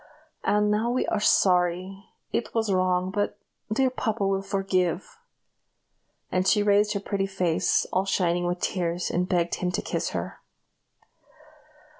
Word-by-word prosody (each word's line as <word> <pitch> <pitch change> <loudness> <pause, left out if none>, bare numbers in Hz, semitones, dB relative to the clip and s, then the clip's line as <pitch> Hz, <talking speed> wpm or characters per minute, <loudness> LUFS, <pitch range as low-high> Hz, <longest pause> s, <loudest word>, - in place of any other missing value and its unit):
"And 210 0 +2
now 215 +3 +1
we 250 +1 0
are 215 - 0
sorry; 185 0 +2 0.3
it 235 - -3
was 220 -3 +1
wrong; 185 0 +1
but 205 +1 -1 0.3
the 215 - -2
dear 265 +1 +3
papa 220 -5 -1
will 195 0 +1
forgive!" 195 - -1 1.1
and 185 +1 +1
she 210 +1 +4
raised 205 +1 +3
her 200 - -1
pretty 195 -1 -2
face, 180 -4 +1
all 190 +1 +2
shining 175 -2 +1
with 175 0 -2
tears, 175 -1 -1
and 180 +1 -1
begged 175 -2 +1
him 180 -1 0
to - - -1
kiss - - -2
her. - - -5
195 Hz, 150 wpm, -26 LUFS, 180-205 Hz, 1.1 s, she